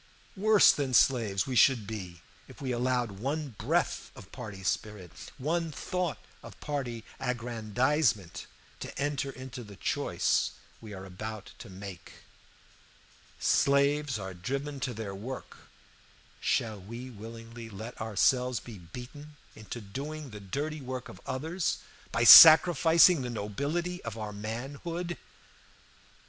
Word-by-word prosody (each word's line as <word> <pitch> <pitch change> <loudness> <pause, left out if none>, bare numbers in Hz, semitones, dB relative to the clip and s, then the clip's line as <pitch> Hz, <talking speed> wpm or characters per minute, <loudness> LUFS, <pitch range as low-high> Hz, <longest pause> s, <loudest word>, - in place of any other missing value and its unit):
Worse 210 +1 +6
than 135 -3 -1
slaves 110 -8 +3
we 130 - -4
should 120 -3 +5
be 95 -5 -7 0.2
if - - -14
we 130 -2 -3
allowed 125 -1 0
one 145 +5 -2
breath - - 0
of 95 - -13
party 105 -6 -8
spirit, 95 -2 -3 0.3
one 165 +4 -1
thought 175 - -3 0.2
of - - -12
party 125 -6 -4 0.2
aggrandizement, 120 - -1 0.3
to - - -8
enter 140 -1 -1
into 130 -2 -8
the 105 -2 -12
choice - - 0 0.3
we 110 - -10
are 95 -1 -8
about 105 +3 -7
to 115 -2 -10
make. 95 -1 -10 1.3
Slaves 140 -1 +2
are 95 -2 -6
driven 135 +10 -4
to 125 -2 -3
their 105 -3 -5
work; 120 +7 -7 0.8
shall 110 -3 0
we 120 +6 -8
willingly 115 +1 -10
let 110 +4 -8
ourselves 125 +3 +2
be 115 -5 -11
beaten 125 - -11 0.2
into 110 +2 -8
doing 140 +7 -7
the 105 - -8
dirty 145 +10 -4
work 130 -2 -6
of 95 - -12
others 160 +7 -2 0.3
by 115 - +1
sacrificing 165 +3 +9
the 125 - -4
nobility 140 - -3
of 115 -1 -6
our 105 -1 -5
manhood? 140 +11 -5
125 Hz, 130 wpm, -29 LUFS, 105-145 Hz, 1.3 s, sacrificing